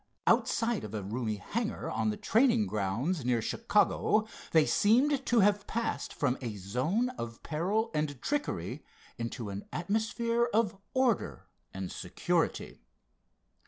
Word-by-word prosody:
Outside 230 -2 +2
of 110 0 -6
a 105 - -3
roomy 110 +2 -2
hangar 220 - -3
on 110 0 0
the 105 - -2
training 230 -1 +3
grounds 115 - -1
near 120 -1 +2
Chicago, 215 - +2 0.3
they 160 -2 +5
seemed 265 +6 +3
to 235 -2 +4
have 205 +1 +3
passed 230 +1 -2
from 130 -3 0
a 115 -4 -4
zone 130 - 0
of 115 0 -6
peril 200 +9 0
and 150 -3 -1
trickery 290 - -2 0.4
into 115 -2 -4
an 100 +1 -6
atmosphere 225 +6 0
of 220 -4 +2 0.2
order 260 -5 +1 0.3
and 95 -1 -5
security. - - -1
180 Hz, 130 wpm, -31 LUFS, -, 0.4 s, they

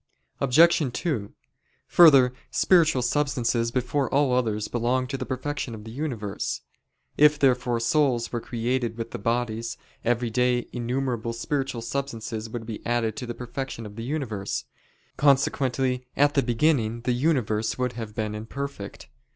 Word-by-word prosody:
Obj. 145 +1 +4
2: 120 - -2 0.6
Further, 135 -7 +7 0.2
spiritual 165 -8 +3
substances 120 -3 +1
before 130 +2 -1
all 140 -2 +3
others 110 -4 0
belong 125 +2 0
to 135 +2 -4
the 130 -2 -4
perfection 130 -2 -3
of 105 - -10
the 110 - -9
universe. 120 -7 -3 0.6
If 150 0 +6
therefore 125 -4 +2
souls 120 0 +1
were 120 - -2
created 120 0 -2
with 115 0 -5
the - - -5
bodies, 115 +1 -1 0.3
every 120 0 0
day 125 +1 +1
innumerable 120 -1 -2
spiritual 135 0 -2
substances 115 -3 -4
would 115 0 -6
be 110 -1 -7
added 115 -2 0
to 125 -4 -5
the 120 - -5
perfection 125 -1 -5
of 105 -1 -9
the 115 - -6
universe: 120 -8 -3 0.5
consequently 130 -2 +2
at 145 0 +4
the 140 - +3
beginning 120 -2 +1
the 125 +1 0
universe 120 -6 0
would 125 -1 -1
have 110 -3 -7
been 105 -1 -2
imperfect. 110 0 -6
125 Hz, 145 wpm, -25 LUFS, 115-135 Hz, 0.6 s, Further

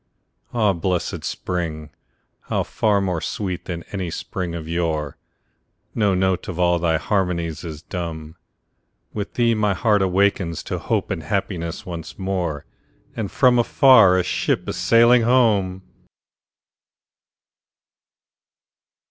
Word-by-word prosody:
Ah, 110 -4 +2
blessed 90 0 -2
spring!—how 80 -4 -5
far 105 -2 +1
more 90 -4 -1
sweet 95 -3 -4
than 85 -1 -5
any 95 -4 -3
spring 85 +1 -4
of 80 -2 -6
yore! 80 -3 -2 0.8
No 105 -4 +2
note 95 -1 0
of 90 - -5
all 90 -1 +2
thy 80 -1 +1
harmonies 85 -3 -1
is 80 -2 -7
dumb; 80 -3 -6 0.8
With 105 -2 -5
thee 120 -1 +3
my 105 -3 +1
heart 105 -3 +2
awakes 95 -3 +1
to - - -4
hope - - -1
and 80 - -2
happiness 85 0 -3
once 85 -3 -7
more, 90 -6 -3 0.5
And 105 -4 -3
from 125 -2 +4
afar 115 -6 +6
a 90 - +2
ship - - -1
is - - -3
sailing 115 +7 +5
home! 105 -6 +2
90 Hz, 120 wpm, -22 LUFS, 85-105 Hz, 0.8 s, afar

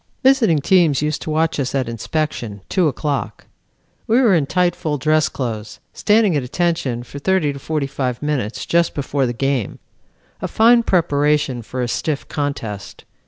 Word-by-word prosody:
"Visiting 260 - +4
teams 155 -2 +3
used 150 0 -1
to - - -5
watch 160 0 0
us 135 0 -2
at 130 -3 0
inspection, 115 -3 -3
two 180 -4 +2
o'clock. 145 0 -3 0.6
We 230 +2 +4
were 235 -7 +4
in 155 -6 +2
tight 180 +1 +1
full 150 -2 -2
dress 155 +2 +2
clothes, 110 -5 -5
standing 210 -4 +3
at 145 - +1
attention 130 -3 -1
for 140 +3 -9
thirty 165 -3 +1
to 140 - -8
forty 150 0 -2
five 130 -3 -3
minutes 140 -7 -2
just 170 0 +1
before 140 -2 -1
the - - -1
game. 130 -2 -1 0.6
A - - -2
fine 235 +2 +5
preparation 150 - +1
for 125 +3 -4
a - - -1
stiff 145 +4 -2
contest. 115 -9 -5
145 Hz, 165 wpm, -19 LUFS, 130-170 Hz, 0.6 s, fine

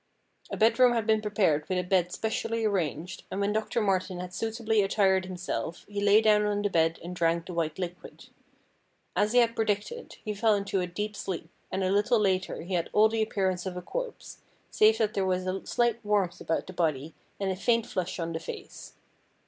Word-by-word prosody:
A - - -4
bedroom 240 +3 +5
had 230 -3 0
been 220 -1 +3
prepared 195 -8 +1
with 185 - 0
a 180 - 0
bed 180 -1 +1
specially 225 +1 -2
arranged, 180 -3 -2
and 190 - -4
when 200 +1 +1
Doctor 220 +2 -1
Martin 190 -2 0
had 180 0 -6
suitably 225 0 0
attired 195 -1 +2
himself 180 -2 -4
he 205 -1 -4
lay 205 +1 +6
down 210 -1 +4
on 205 0 0
the 205 - 0
bed 165 -1 +2
and 175 +1 -6
drank 165 0 +1
the 185 - -7
white 160 -2 -1
liquid. 180 -1 -7 0.9
As 210 +2 +2
he - - +3
had 230 -1 +1
predicted, 220 - -2
he 215 - -2
fell 215 +1 +3
into 200 -1 -1
a 180 - -2
deep 210 +4 -4
sleep, 180 -4 -5 0.2
and 190 0 -1
a 185 - +1
little 210 +5 +3
later 190 -4 0
he 185 +3 -6
had 170 -2 0
all 215 +1 +6
the 225 0 -1
appearance 190 -4 -1
of 180 -1 -5
a - - -4
corpse, - - -6 0.3
save 220 +1 +5
that 220 -2 +1
there 195 - 0
was 185 -1 0
a 185 +1 -3
slight 235 -1 +1
warmth 205 -4 0
about 165 - -1
the 185 - -9
body, 155 -3 -1 0.3
and 195 -1 0
a - - -2
faint 230 +3 +1
flush 185 -1 -3
on 165 -1 -3
the 160 - -2
face. - - -9
195 Hz, 210 wpm, -28 LUFS, 180-215 Hz, 0.9 s, lay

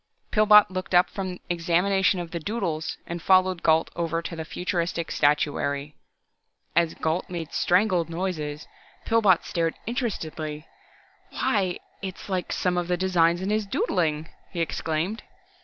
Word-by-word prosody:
Pillbot 210 -2 +6
looked 185 0 -3
up 175 - +5
from 185 -2 -4
examination 180 +3 +2
of 170 -1 -6
the 170 - -3
"doodles" 170 -4 -3
and 170 0 -5
followed 185 -1 +3
Gault 160 0 +3
over 165 -1 -1
to 165 - -5
the 160 - -4
futuristic 170 -1 -2
statuary. 145 0 +1 0.8
As 170 -1 +2
Gault 160 +3 -1
made 170 -3 -5
strangled 180 -2 +2
noises, 165 -4 -3 0.4
Pillbot 210 -6 +4
stared 165 -2 -1
interestedly. 160 - -3 0.6
"Why 190 -4 0 0.2
its 190 0 -7
like 185 -2 -2
some 180 -1 0
of 175 - -3
the 180 0 0
designs 175 -1 +2
in 195 - -1
his 215 -1 0
doodling," 160 -5 0 0.2
he 175 - -6
exclaimed. 165 +5 -2
175 Hz, 140 wpm, -25 LUFS, 165-190 Hz, 0.8 s, Pillbot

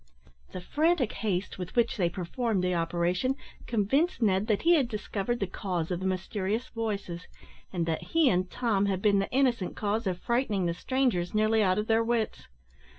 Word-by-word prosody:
The 185 - -6
frantic 305 - +1
haste 195 -3 -2
with 180 -1 -6
which 235 -1 +2
they 175 -4 +2
performed 195 +3 -2
the 180 0 +1
operation 175 +8 0 0.3
convinced 255 - +1
Ned 205 -2 +2
that 210 -3 +1
he 340 +1 +6
had 285 -7 +3
discovered 215 +1 -3
the 195 - 0
cause 180 -2 -3
of 175 - -1
the 190 - -2
mysterious 190 +5 -2
voices, 200 -6 -4 0.4
and 175 -3 -1
that 165 -1 -1
he 325 -3 +2
and 185 -4 +2
Tom 210 -4 +1
had 190 -1 -1
been 205 -2 +4
the 195 - -1
innocent 250 -7 +1
cause 215 0 -1
of 180 -2 -1
frightening 215 -3 0
the 170 - 0
strangers 215 -3 0
nearly 215 +1 +3
out 185 -2 +3
of 210 - 0
their 225 +1 +3
wits. 230 -2 -1
205 Hz, 185 wpm, -28 LUFS, 185-235 Hz, 0.4 s, he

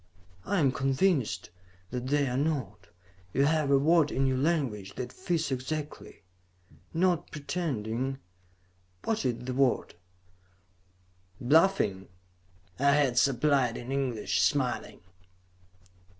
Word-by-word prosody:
I 200 - 0
am 140 -4 +3
convinced 135 - 0 0.4
that 125 0 -4
they 145 0 +2
are 125 - -2
not 135 -8 -2 0.5
you 140 - +3
have 155 -1 +1
a 140 - +5
word 155 +1 +3
in 135 - +1
your 130 -1 +1
language 130 - -1
that 125 -1 -5
fits 170 -5 -2
exactly. 145 +4 -5 0.7
Not 175 -1 +1
pretending... 135 -5 -3 0.9
what 220 -10 -1
is 120 -1 -2
the 130 - -3
word?" 130 -1 +1 1.5
"Bluffing?" 125 - +2 0.7
I 140 +1 +4
had 135 -4 +3
supplied 135 -1 +2
in 120 +2 -7
English, 130 -5 0
smiling. - - 0
135 Hz, 110 wpm, -29 LUFS, 125-155 Hz, 1.5 s, a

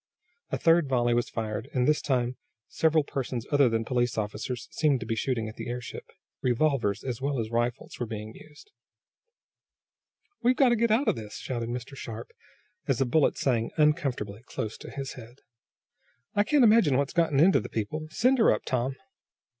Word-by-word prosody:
A - - -1
third 165 -3 +3
volley 120 -2 +2
was 120 0 0
fired, 110 -1 -4
and 125 -1 +2
this 150 0 +3
time 125 -2 0 0.3
several 160 -1 +2
persons 130 -4 -4
other 140 -3 +5
than 115 0 -1
police 120 0 0
officers 110 +3 -3
seemed 150 -5 +2
to - - -4
be 115 - -1
shooting 115 -2 -1
at 110 - -9
the - - -6
airship. 125 0 -6 0.3
Revolvers 125 -5 +1
as 125 -3 -4
well 140 0 -1
as 110 0 -3
rifles 120 +2 -2
were 120 - -2
being 110 0 -6
used. 150 -1 -16 1.7
"We're 250 +1 +3
got 265 -2 +5
to 240 - +3
get 235 +1 +2
out 230 +6 +2
of - - +3
this!" 110 -2 -8
shouted 120 -3 -4
Mr. 125 +3 -5
Sharp, 115 -3 -7 0.6
as 135 -5 +1
a 135 - +3
bullet 140 +4 +2
sang 115 -4 +1
uncomfortably 135 -9 +1
close 110 -1 -4
to - - -9
his 135 -1 -5
head. 120 +1 -13 0.9
"I 205 0 +2
can't 290 +3 +4
imagine 210 - +5
what's 140 0 0
gotten 165 -5 +2
into 180 +5 +6
the - - -7
people. 155 +9 -3
Send 255 +9 +2
her 225 - +6
up, - - -1
Tom!" 130 +1 -1
130 Hz, 185 wpm, -28 LUFS, 115-150 Hz, 1.7 s, into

